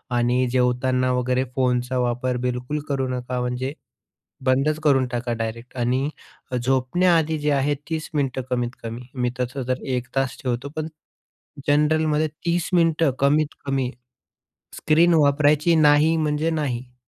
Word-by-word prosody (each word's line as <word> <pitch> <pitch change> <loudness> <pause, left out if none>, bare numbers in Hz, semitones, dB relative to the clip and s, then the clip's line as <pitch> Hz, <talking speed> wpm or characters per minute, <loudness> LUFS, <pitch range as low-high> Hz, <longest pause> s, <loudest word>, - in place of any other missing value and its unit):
आणि 125 +1 +2
जेवताना 125 0 +1
वगैरे 125 +1 +1
फोनचा 125 -1 0
वापर 125 +1 0
बिलकुल 125 +4 -2
करू 135 -2 0
नका, 125 0 -3
म्हणजे 125 +3 -2 0.7
बंदच 135 +4 +2
करून 135 -3 +4
टाका 120 0 -2
डायरेक्ट 115 +2 -5
आणि 130 +4 +1 0.5
झोपण्याआधी 160 +5 +2
जे 150 0 0
आहे 140 +1 +1 0.2
30 160 0 -3
मिनिटं 135 -3 -1
कमीत-कमी 120 -1 -4
मी 125 -1 0
तसं 130 +2 -2
तर 130 - -1
1 125 0 -4
तास 135 -2 0
ठेवतो, 125 +2 -2
पण 155 0 -2 0.8
जनरलमध्ये 155 +1 +2 0.2
30 170 0 +1
मिनिटं 165 -4 +3
कमीत-कमी 140 -2 +1 0.9
स्क्रीन 165 +2 +4
वापरायची 150 +3 +3
नाही 155 +1 +5
म्हणजे 155 +1 0
नाही. 130 -5 -3
130 Hz, 125 wpm, -23 LUFS, 125-150 Hz, 0.9 s, नाही